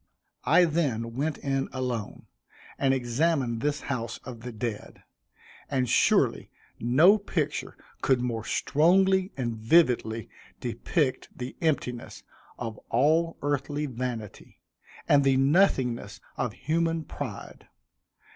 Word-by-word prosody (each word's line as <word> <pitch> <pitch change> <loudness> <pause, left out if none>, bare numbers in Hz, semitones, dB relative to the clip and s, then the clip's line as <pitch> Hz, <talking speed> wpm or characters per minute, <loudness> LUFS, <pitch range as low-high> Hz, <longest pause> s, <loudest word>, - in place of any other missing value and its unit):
I 180 - +6
then 135 -9 -1
went 145 +4 -1
in 135 -1 -2
alone, 125 -5 -4 0.5
and 135 -1 +3
examined 130 -1 0
this 150 +2 -1
house 120 -4 -3
of 125 -2 -8
the 125 +1 -6
dead, 110 -1 -6 0.7
and 130 -3 0
surely - - +2 0.3
no 155 - +5
picture 155 -7 -3 0.2
could 130 -2 +3
more 120 -3 -2
strongly 190 - +3
and 120 -3 -2
vividly 115 - +2 0.3
depict 130 +4 -1
the 125 +1 -6
emptiness 125 -7 -2 0.3
of 115 -3 -5
all 160 +7 +2
earthly 145 +1 -1
vanity, 120 -5 -6 0.5
and 140 -1 +5
the 135 -1 +3
nothingness 135 - +2 0.2
of 125 -3 -2
human 165 +3 -1
pride. 140 -7 -8
130 Hz, 110 wpm, -27 LUFS, 120-155 Hz, 0.7 s, I